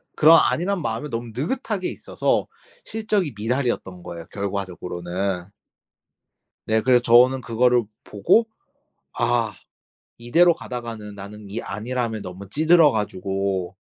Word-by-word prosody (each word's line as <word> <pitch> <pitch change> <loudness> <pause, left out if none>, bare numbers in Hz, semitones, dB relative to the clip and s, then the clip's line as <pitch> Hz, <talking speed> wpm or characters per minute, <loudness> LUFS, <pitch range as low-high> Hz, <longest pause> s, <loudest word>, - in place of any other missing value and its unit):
그런 160 +2 +7
안일한 180 +2 -1
마음에 150 0 -3
너무 115 -1 -5
느긋하게 195 - -2
있어서 - - -1 0.4
실적이 210 - -1
미달이었던 115 -6 -2
거예요, 85 -1 -8
결과적으로는. 95 -2 -3 1.2
네, 110 0 +3
그래서 125 +1 +4
저는 125 +2 +5
그거를 120 0 +2 0.2
보고 105 - +2 0.7
'아, - - +1 0.6
이대로 165 +9 +4
가다가는 115 -7 -7
나는 100 +1 -10
이 110 +4 -4
안일함에 115 0 -3
너무 95 0 -9
찌들어 160 +3 +5
가지고 95 -3 -2
115 Hz, 295 characters per minute, -23 LUFS, 100-145 Hz, 1.2 s, 그런